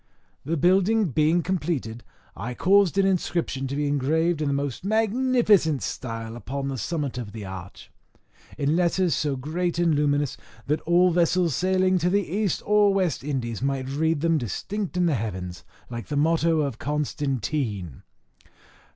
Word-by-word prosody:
The 165 +4 -1
building 195 +5 +3
being 155 +5 +2
completed, 150 -11 -2 0.3
I 120 +7 -5
caused 195 +2 +3
an 195 - +4
inscription 170 -7 -1
to 135 - -4
be 145 +1 0
engraved 155 +4 +1
in 150 - 0
the - - +1
most 140 -1 -2
magnificent 220 - +2
style 115 -2 -5
upon 135 +3 -4
the 135 - -3
summit 145 - -3
of 105 -4 -7
the 110 -3 -7
arch, 95 0 -9 0.7
in 145 +1 +1
letters 180 0 +2
so 145 -3 0
great 165 +6 -2
and 170 -2 +3
luminous, 145 -1 +1 0.3
that 150 +2 0
all 180 +1 +5
vessels 170 -2 +2
sailing 185 +1 +2
to 175 +1 +1
the 200 +1 +1
East 200 +1 -1
or 210 -1 +4
West 185 -9 0
Indies 125 -6 -3
might 135 -1 -1
read 160 +2 0
them 165 -1 +2
distinct 185 - -4
in 180 - +3
the 165 - +2
heavens, 95 -7 -4 0.3
like 120 -1 -6
the 145 - -2
motto 165 +1 +2
of 140 -5 -3
Constantine. 135 - -2
155 Hz, 160 wpm, -25 LUFS, 135-180 Hz, 0.7 s, all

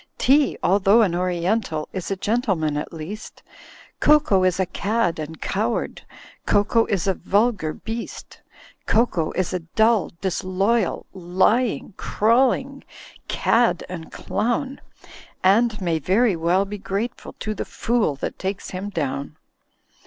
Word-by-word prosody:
"Tea, 280 +2 +3
although 200 +4 +5
an 185 -5 +1
Oriental, 175 -1 -1
Is 185 -3 -4
a 195 - 0
gentleman 190 -8 0
at 150 - -4
least; 170 +7 -8 0.6
Cocoa 295 -11 +4
is 185 0 +2
a 190 - +2
cad 200 -2 -1
and 155 +1 -6
coward. 220 +4 -2 0.5
Cocoa 215 +3 +3
is 195 -5 0
a 195 - +2
vulgar 205 -5 +1
beast; 225 +7 -7 0.5
Cocoa 220 -8 +2
is 185 -1 -1
a 185 - 0
dull, 220 +3 +2
disloyal. 190 +3 0
Lying, 190 +6 +1
crawling 260 +5 +1 0.4
cad 230 -6 +2
and 170 -3 -7
clown. 260 +4 -2 0.6
And 215 +4 +3
may 170 -4 0
very 195 - +2
well 175 +4 +2
be 205 +1 -7
grateful 200 +5 -4
To 215 - -4
the - - -4
fool 230 -11 0
that 135 - -5
takes 190 +1 -4
him 190 +2 -4
down. 140 -4 -3
195 Hz, 130 wpm, -23 LUFS, 175-230 Hz, 0.6 s, although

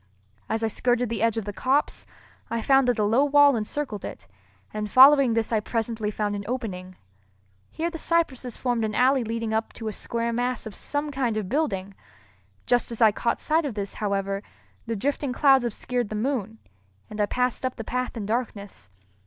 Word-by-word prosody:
As 225 0 -1
I - - +2
skirted 245 +2 0
the 230 -2 -3
edge 230 -1 +2
of 225 - -2
the 205 - -5
copse, 270 +7 0 0.4
I 230 -1 -2
found 270 -1 +4
that 245 - +2
a 210 - +1
low 225 +7 +3
wall 290 -1 +5
encircled 220 0 -3
it, 95 - -8 0.5
and 210 0 -3
following 265 0 +7
this 230 0 0
I 220 - +3
presently 225 0 -2
found 210 -1 -2
an 200 - -4
opening. 185 -7 -5 0.7
Here 335 +2 -3
the 330 - -6
cypresses 270 -9 0
formed 245 -3 -1
an 215 -1 -2
alley 260 0 +3
leading 225 0 -3
up 220 0 -1
to 220 -2 -5
a - - -6
square 235 +2 -3
mass 245 +1 -2
of 220 - -7
some 290 +6 -3
kind 250 -5 -1
of 205 -4 -3
building. 200 -10 -1 0.7
Just 245 -1 +2
as 230 - -5
I 220 -3 +6
caught 235 +3 -1
sight 320 +2 +1
of 275 -7 -4
this, 200 -2 -4
however, 195 -1 -2 0.5
the 230 - -2
drifting 275 +4 -1
clouds 270 -2 +4
obscured 240 0 -2
the 215 - -4
moon, 225 -2 -2 0.5
and 210 0 -4
I 205 - +2
passed 250 +3 -1
up 255 0 -2
the 225 - -6
path 250 +2 -3
in 210 - -4
darkness. 205 - -4
230 Hz, 195 wpm, -25 LUFS, 215-260 Hz, 0.7 s, following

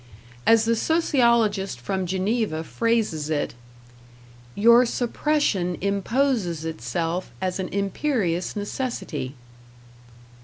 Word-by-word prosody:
As 225 -1 +6
the 230 0 +2
sociologist 235 - +2
from 185 +8 -2
Geneva 190 -2 -1
phrases 215 -8 0
it, 150 -2 -1 1.0
"Your 235 +3 +6
suppression 240 - 0
imposes 200 - 0
itself 165 +4 -3
as 185 0 -2
an 185 - -2
imperious 200 - -1
necessity." 205 - -4
200 Hz, 85 wpm, -24 LUFS, 175-235 Hz, 1.0 s, As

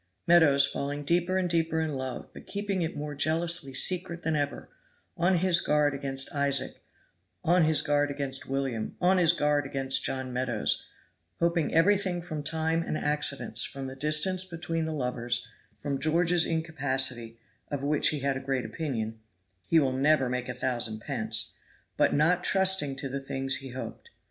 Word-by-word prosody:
Meadows 155 -5 +5
falling 145 +1 -4
deeper 175 +4 +1
and 185 -1 0
deeper 165 -1 +1
in 160 -2 -2
love, 130 -2 -5
but - - -13
keeping 200 -2 -2
it 165 -2 -3
more 150 0 -5
jealously 160 0 0
secret 180 +1 +1
than 160 -1 0
ever; 145 -1 -3 0.5
on 175 +2 +2
his 175 0 +3
guard 150 -1 +2
against 135 -1 -1
Isaac, 140 -2 -1 0.6
on 175 0 +4
his 155 -1 +2
guard 145 0 +1
against 140 -2 -1
William, 135 -5 -3
on 185 +1 +3
his 170 -2 +5
guard 150 -3 +1
against 135 -1 0
John 130 -1 -3
Meadows; 125 -3 -1 0.5
hoping 170 -2 +1
everything 190 +1 +3
from 155 -4 -5
time 160 +2 -1
and 155 - -3
accidents, 150 -2 0
from 135 -1 -4
the 130 0 -7
distance 155 +6 +2
between 165 -2 -4
the 160 - -3
lovers, 125 -4 -2 0.3
from 140 -2 -3
George's 165 +3 +3
incapacity, 135 -7 -1 0.3
of 140 -1 -4
which 145 +1 +2
he 150 -3 +1
had 140 0 0
a - - -3
great 135 -3 -2
opinion 115 -3 -4 0.5
"He 165 - +4
will 135 -3 +1
never 135 0 +2
make 125 0 -3
a 125 - -4
thousand 120 -4 -2
pence" - - -1 0.4
but - - +3
not 175 +5 +2
trusting 190 -8 +3
to 135 - -5
the 135 +1 -5
things 135 0 -1
he 135 -1 -8
hoped. 130 - -8
145 Hz, 170 wpm, -28 LUFS, 135-165 Hz, 0.6 s, Meadows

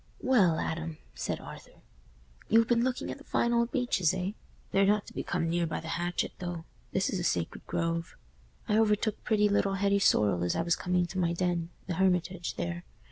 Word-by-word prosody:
"Well, 195 -11 +4
Adam," 160 -1 -3 0.2
said - - -3
Arthur, - - -12 0.7
"you've 225 +1 +5
been 235 -1 +3
looking 255 0 -1
at - - -7
the - - -13
fine 235 -4 +1
old 235 0 +2
beeches, 215 - +1
eh? 185 +1 -2 0.4
They're 195 - +4
not 205 0 +2
to - - -12
be - - -3
come 170 -1 -1
near 170 0 +1
by 160 - -3
the 160 - -7
hatchet, 175 +1 -1
though; 175 -2 -5 0.3
this 190 - +1
is 190 - -1
a - - -2
sacred 85 - -2
grove. 165 -1 -2 0.5
I 215 -1 +3
overtook 215 0 +1
pretty 210 -2 +3
little 200 -1 +1
Hetty 200 +1 +2
Sorrel 100 - +3
as 90 - 0
I - - +1
was 170 0 +2
coming 180 0 +1
to 185 +2 -5
my 170 -1 +1
den—the 175 0 -2
Hermitage, 180 -1 0
there. 85 0 -3
180 Hz, 195 wpm, -30 LUFS, 165-210 Hz, 0.7 s, you've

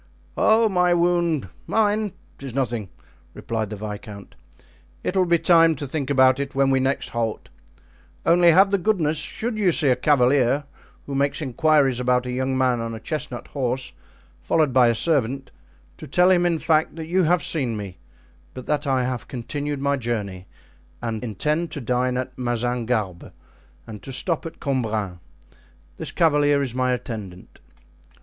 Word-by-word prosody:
"Oh, 220 +1 +4
my 180 -3 +2
wound—mine—'tis 175 - -1
nothing," 120 -7 -2 0.5
replied 110 -2 -3
the 105 - -5
viscount; 105 0 -8 0.7
"it 185 - -2
will 185 -1 +3
be 170 0 +4
time 165 -1 +4
to 145 - -5
think 140 0 -4
about 130 -1 +4
it 140 -1 -4
when 135 0 +3
we 135 - +3
next 135 +1 -1
halt; 115 -2 -3 0.8
only 175 +1 +5
have 195 +4 +5
the 200 - +2
goodness, 170 -6 +1
should 220 +7 -3
you 190 -4 +3
see 150 -3 +3
a 125 - +4
cavalier 135 0 +3 0.4
who 140 - -6
makes 140 +1 0
inquiries 145 -2 +2
about 125 0 +1
a 125 - -4
young 130 +1 -1
man 130 -2 +2
on 115 0 -4
a - - -7
chestnut 125 +1 -5
horse 130 -2 -3 0.5
followed 155 -5 +1
by 125 -2 +5
a 115 - +2
servant, 135 -2 0 0.5
to - - -10
tell 180 +6 +4
him, 175 -1 +3
in 170 -1 +1
fact, 155 0 +1
that 160 -1 -6
you 180 +2 +1
have 170 -1 +2
seen 130 -9 0
me, 95 -4 -8 0.6
but 130 - -8
that 150 -1 -1
I 130 -2 +2
have 125 -1 -3
continued 145 +3 -4
my 140 0 +1
journey 105 -7 -4 0.5
and 115 -1 -4
intend 150 - -1
to - - -4
dine 125 0 0
at 130 0 -4
Mazingarbe 120 -6 -2 0.5
and 110 -2 -9
to 135 - -8
stop 165 +5 -2
at 165 - -11
Cambrin. 110 -9 -2 0.8
This - - -5
cavalier 145 -3 +3
is 130 -4 -4
my 130 0 0
attendant." 110 -7 -6
135 Hz, 160 wpm, -23 LUFS, 120-160 Hz, 0.8 s, only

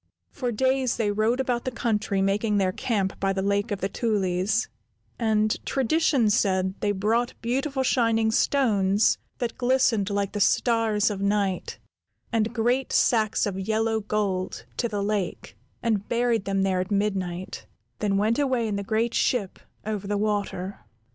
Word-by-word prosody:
For 250 -3 -3
days 260 +2 +1
they 210 -3 +1
rode 220 +4 +1
about 250 -2 0
the - - -1
country, 215 -5 -1
making 205 +2 +1
their 190 -2 +2
camp 195 -2 -2
by 195 0 +1
the 190 0 -2
Lake 200 +3 0
of 205 -2 -3
the 195 - +1
Tulies, 200 0 0 0.5
and 215 -2 +1
tradition 270 -3 +2
said 190 -2 +1
they 205 - +1
brought 220 +5 0
beautiful 265 +3 -1
shining 225 -3 +2
stones, 210 -6 +2 0.2
that 240 -2 -4
glistened 245 -5 +2
like 200 -1 -1
the 205 - -4
stars 225 -1 +2
of 200 -1 -5
night, 200 -2 0 0.6
and 225 -1 +1
great 245 +3 0
sacks 220 -2 +2
of 195 -2 -3
yellow 220 +2 0
gold 200 -3 -2
to 235 - 0
the 205 -2 -2
lake, 205 -3 -3 0.3
and 215 -4 0
buried 235 -3 +1
them 195 -1 0
there 190 -1 +1
at 185 +1 -2
midnight; 190 -3 -2 0.3
then 200 -2 +1
went 220 +5 +1
away 255 -5 +1
in 205 -2 -2
the 200 - -3
great 225 +3 0
ship 210 -7 0 0.3
over 210 -2 -3
the 205 0 0
water. 205 -2 -2
215 Hz, 160 wpm, -25 LUFS, 200-235 Hz, 0.6 s, their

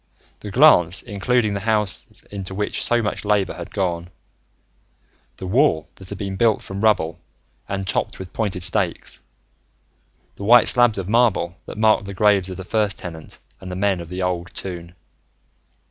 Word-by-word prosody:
the 105 - -8
glance 100 - +5
including 110 +1 0
the 100 - -2
houses 105 -2 -1
into 95 -2 -5
which 105 +1 -2
so 120 -1 +2
much 105 - -3
labor 105 -2 +1
had 85 - -9
gone, 90 -3 -2 1.3
the 95 - -7
wall 95 - +2
that 95 -1 -13
had 100 - -6
been 95 -1 -4
built 110 +2 +3
from 95 +1 -7
rubble 85 -7 +2 0.5
and 95 -1 -3
topped - - -1
with 95 -1 -9
pointed 100 -5 -2
stakes, 90 -1 0 1.2
the - - -7
white 120 +3 +6
slabs 120 -3 +4
of 95 -2 -4
marble 105 -6 +2
that - - -8
marked 110 -2 +3
the 100 0 -7
graves 100 -2 +3
of 95 - -6
the 95 - -6
First 105 +2 0
Tenant 80 -3 -9 0.2
and 95 -1 -8
the - - -4
men 95 -1 0
of 85 - -10
the 90 +1 -4
Old 90 -2 -2
Toon.... 85 -2 -6
95 Hz, 170 wpm, -21 LUFS, 90-105 Hz, 1.3 s, white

